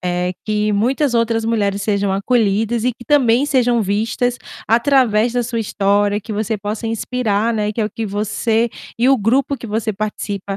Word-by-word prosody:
eh, 180 0 -1
que 210 0 0
muitas 250 +6 +1
outras 230 -1 +1
mulheres 205 -3 0
sejam 200 -1 0
acolhidas 220 +2 +1
e 250 - +2
que 240 +1 -14
também 260 -3 +3
sejam 245 -5 +2
vistas 225 +5 -1 0.3
através 235 -2 +3
da 245 0 0
sua 235 0 -3
história, 205 -1 +1
que 215 - -7
você 215 +1 -1
possa 210 +3 -4
inspirar, 225 -1 -1
né, 210 -1 -1
que 225 - -4
é 215 - +2
o 210 - -3
que 225 -1 -4
você 215 +3 0 0.3
e 240 +3 +2
o 270 - +5
grupo 260 +6 +1
que 235 - -9
você 220 0 -2
participa 200 -1 -4
220 Hz, 180 wpm, -18 LUFS, 205-240 Hz, 0.3 s, o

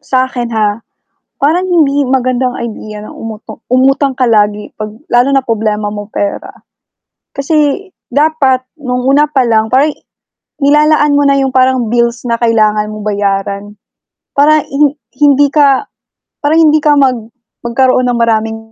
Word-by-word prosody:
Sa'kin, 255 -2 -2
ha, 210 0 0 0.6
parang 335 +6 +2
hindi 290 -6 +2
magandang 255 -1 0
idea 215 -2 -7
na - - -11
umuto 220 -1 -9
umutang 270 +1 +2
ka 260 - -1
lagi 210 -1 +1
'pag 215 0 -5 0.2
lalo 245 +3 +3
na 270 - +3
problema 215 -3 -2
mo 205 0 -6
pera. 200 - -3 0.8
Kasi 300 +6 -1 0.2
dapat 285 -2 +1 0.2
no'ng 250 -3 -3
una 290 +2 +4
pa 290 -3 0
lang, 220 -1 +1
parang 275 +4 +4
i - - -29 0.6
nilalaan 295 +1 +3
mo 285 - +3
na 275 0 +3
'yong 265 -1 -1
parang 255 -2 +2
bills 235 +1 0
na 230 - +1
kailangan 215 -2 +1
mong 215 0 -8
bayaran, 200 -1 -2 0.7
para 300 +1 +3
hin 285 +1 0 0.2
hindi 290 -1 +4
ka 285 +3 +3 0.6
para 295 +1 +1
hindi 310 -2 +4
ka 295 0 +3
mag 265 -3 +2 0.5
magkaroon 255 +1 +1
ng 240 -1 0
maraming 225 -1 0
255 Hz, 145 wpm, -12 LUFS, 220-285 Hz, 0.8 s, una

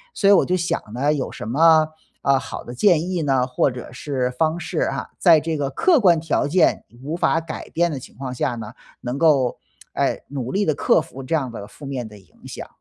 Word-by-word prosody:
所 200 - +1
以 200 - +8
我 - - +5
就 185 +1 0
想 175 0 -1
呢， 140 +6 +1
有 140 - -3
什 - - -7
么， 155 +4 +5 0.3
呃， 135 -1 +3
好 - - -7
的 120 - -8
建 175 +4 +2
议 175 -3 -1
呢， 135 -3 +2
或 130 +2 +1
者 125 -1 -8
是 125 -1 -2
方 160 +6 0
式 160 -1 -4
啊， 135 - -1
在 165 -4 +6
这 160 +1 -3
个 140 -2 -1
客 330 - +3
观 175 -6 +4
条 155 -2 0
件 180 +4 +2 0.2
无 155 +4 -3
法 165 -1 +2
改 160 -1 -7
变 170 0 +1
的 140 - -4
情 - - -14
况 130 -2 -5
下 125 0 -1
呢， 110 -1 -8 0.3
能 125 +4 -4
够， 140 -7 +3 0.3
哎， - - 0
努 130 -3 -4
力 200 +1 +1
地 155 - +2
克 - - +3
服 135 - -8
这 145 +5 -1
样 130 -6 -1
的 105 -3 -8
负 140 +7 -13
面 130 -4 -4
的 105 -1 -13
影 90 -6 -17
响。 - - -8
145 Hz, 250 characters per minute, -22 LUFS, 125-165 Hz, 0.3 s, 以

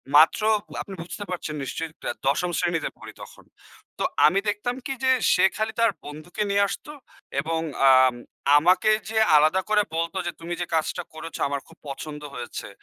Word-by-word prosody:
মাত্র 155 +7 +6 0.4
আপনি 195 - -8
বুঝতে 205 +4 -7
পারছেন 170 -4 -4
নিশ্চয়ই 165 +4 -4
আ - - -50
দ - - -9 0.2
১০ম 170 +6 +1
শ্রেণীতে 165 -3 0
পড়ি - - -10
তখন। - - -12 0.5
তো - - 0 0.2
আমি 185 +6 +4
দেখতাম 220 +4 -2
কি? 270 - -3
যে, 260 - +3 0.2
সে 180 - +3
খালি 220 0 -1
তার 230 -2 +4
বন্ধুকে 155 +8 -5
নিয়ে 200 0 +3
আসতো 295 - -6 0.5
এবং 160 0 -1 0.3
আম 130 -1 +6 0.4
আমাকে 180 +7 +4 0.2
যেয়ে 220 0 +3
আলাদা 155 +5 +4
করে 210 -1 +4
বলতো 170 +3 -2
যে, 175 - -1
"তুমি 170 +1 -5
যে, - - 0
কাজটা 160 - -1
করেছো, 160 +1 -8
আমার 140 -1 -2
খুব 165 - -18
পছন্দ 150 +2 -7
হয়েছে। 120 - -6
170 Hz, 180 wpm, -25 LUFS, 155-200 Hz, 0.5 s, মাত্র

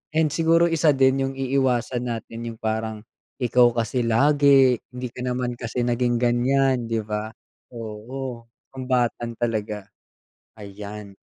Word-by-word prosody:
And 160 -1 +3
siguro 165 +2 +3
isa 160 -2 +3
din 135 0 +3
yung 135 - -5
iiwasan 130 -2 0
natin 115 -1 -5
yung 115 -1 -10
parang, 110 0 -2 0.4
"Ikaw 120 0 +4
kasi 115 +2 0
lagi, 135 +1 +5 0.2
hindi 125 0 -4
ka 125 - -10
naman 125 -1 -1
kasi 120 +1 -3
naging 120 0 +1
ganyan," 125 +1 +2
'di 115 -1 -1
ba. 105 0 -3 0.4
Oo, 115 +2 -7 0.3
sumbatan 125 -2 -1
talaga. 105 -3 -2 0.7
Ayan. 100 0 -9
120 Hz, 130 wpm, -23 LUFS, 115-130 Hz, 0.7 s, lagi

